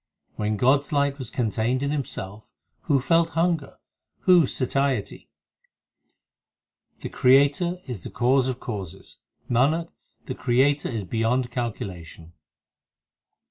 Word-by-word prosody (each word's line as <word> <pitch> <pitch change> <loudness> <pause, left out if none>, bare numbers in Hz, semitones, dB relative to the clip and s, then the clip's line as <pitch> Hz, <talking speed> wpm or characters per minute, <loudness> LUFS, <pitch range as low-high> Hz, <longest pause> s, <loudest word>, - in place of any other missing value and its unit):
When 105 0 -1
God 130 +5 +4
s 140 - -13
light 140 -1 +1
was 125 -4 -6
contained 120 +2 -1
in 140 - -1
Himself, 110 -8 -5 0.4
Who 140 - +3
felt 165 +5 +1
hunger? 165 -4 0 0.4
who 180 -6 +5
satiety? 135 -4 -1 1.7
The - - -5
Creator 145 +7 +3
is 120 -8 -6
the - - -6
Cause 130 +2 +2
of 130 -1 -3
causes; 95 -6 -8 0.3
Nanak, 150 +8 +1 0.4
the 130 - -4
Creator 135 +4 +1
is 115 -5 -3
beyond 115 +5 -1
calculation. 90 -9 -6
130 Hz, 115 wpm, -24 LUFS, 115-140 Hz, 1.7 s, who